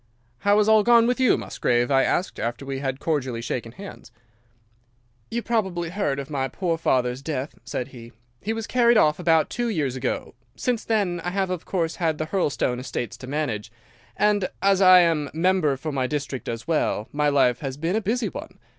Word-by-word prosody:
"'How 205 +1 +3
has 210 0 +3
all 220 -1 +6
gone 235 +1 +5
with 245 +2 +1
you 255 -3 +4
Musgrave?' 120 +2 0
I 135 -1 +5
asked, 180 - -1
after 120 +3 -3
we 135 -1 -4
had 135 -1 -3
cordially 135 -7 -1
shaken 115 0 -4
hands. 195 - -11 1.2
"'You 235 0 -3
probably 190 -7 -1
heard 180 -8 -1
of 140 -1 -5
my 135 -2 -1
poor 170 +5 -1
father's 125 -4 +1
death,' 140 -1 -4
said 125 +2 -4
he; 120 -3 -12 0.3
'he 215 - -2
was 225 -1 -3
carried 240 -1 +4
off 150 -6 +3
about 165 -3 +2
two 240 -1 -1
years 145 - -1
ago. 130 - -3 0.2
Since 245 -3 -1
then 195 -6 0
I 175 - -1
have 190 0 -1
of 180 -3 -4
course 165 -4 -2
had 160 -3 0
the 155 - -2
Hurlstone 150 -7 0
estates 125 -2 -4
to 130 - -10
manage, 120 -7 -3 0.5
and 205 -2 +2
as 195 -1 +3
I 185 -1 +8
am 160 -4 +1
member 165 -4 +2
for 155 +3 -4
my 130 -2 -1
district 140 -2 -4
as 115 0 -5
well, 150 -9 0
my 150 0 +1
life 130 -4 +3
has 135 -2 -5
been 165 +5 -1
a 220 - +1
busy 220 +1 -1
one. - - -9
160 Hz, 200 wpm, -24 LUFS, 135-195 Hz, 1.2 s, I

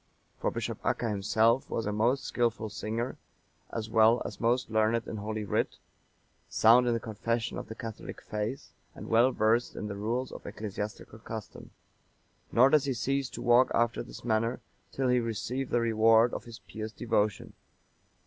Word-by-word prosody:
For - - +1
Bishop - - -4
Acca 115 -2 0
himself 110 +5 +2
was 115 - -2
a 105 - -1
most 115 +6 +1
skilful 115 -2 -1
singer, 115 +4 -3 0.5
as 110 -2 -3
well 110 +2 +5
as 100 - -7
most 120 0 +1
learned 110 +1 +2
in 110 - -5
Holy 110 +1 -3
Writ, 100 - -1 0.7
sound 120 +3 +5
in 120 - +2
the - - -1
confession 115 +1 -2
of - - -8
the 110 - -7
catholic 115 -2 -7
faith, 105 +5 -5 0.2
and - - -9
well 120 +3 +5
versed 115 +1 +1
in - - -5
the 100 - -4
rules 115 +5 -2
of - - -9
ecclesiastical 105 +1 -6
custom; 110 -1 -8 0.8
nor 130 +3 +5
does 150 -2 +4
he 135 -2 -1
cease 135 +4 -1
to - - -7
walk 125 +1 +5
after 120 0 +1
this - - -10
manner, 115 +1 +1 0.3
till 135 -1 -1
he 125 0 +4
receive 120 +3 -3
the 120 - +2
rewards 115 +1 +4
of - - -5
his 115 -1 -9
pious 110 0 -7
devotion. 105 -3 -1
115 Hz, 170 wpm, -29 LUFS, 110-120 Hz, 0.8 s, well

